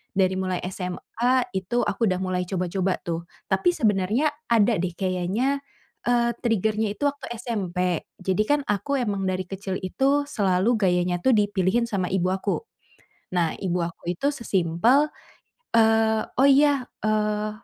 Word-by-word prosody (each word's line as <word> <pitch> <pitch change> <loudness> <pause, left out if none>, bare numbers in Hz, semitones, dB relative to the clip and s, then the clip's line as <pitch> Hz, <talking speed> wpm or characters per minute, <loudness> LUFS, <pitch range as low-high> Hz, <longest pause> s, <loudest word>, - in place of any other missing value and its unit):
dari 190 -1 +2
mulai 185 -1 -1
SMA 235 +8 -1
itu 240 +6 -1
aku 230 - 0
udah 185 -2 0
mulai 185 -1 -1
coba-coba 185 0 -1
tuh 170 0 -3 0.3
tapi 355 -2 +3
sebenarnya 210 +6 +2 0.2
ada 230 0 +4
deh 180 -1 -2
kayaknya, 190 +9 0 0.5
eee, 240 -1 +3
trigger-nya 220 -2 0
itu - - -7
waktu 285 0 -9
SMP, 185 -7 -2 0.2
jadi 190 +2 +1
kan 290 0 +4
aku 205 +8 -1
emang 205 -5 -1
dari 185 0 -1
kecil 195 -1 -4
itu 270 +10 +1
selalu 195 -4 +1
gayanya 180 -1 +2
tuh 260 - +4
dipilihin 205 +2 +2
sama 190 -4 -1
ibu 185 -1 +1
aku. 195 +1 -1 0.8
Nah 170 -2 +2
ibu 180 -2 -1
aku 170 0 -8
itu 180 +10 -3
se-simple, 230 - +2 0.7
eee, 220 -1 +4 0.2
oh 270 - +6
iya, 280 -1 +4 0.2
eee, 215 0 +1
200 Hz, 145 wpm, -24 LUFS, 185-235 Hz, 0.8 s, oh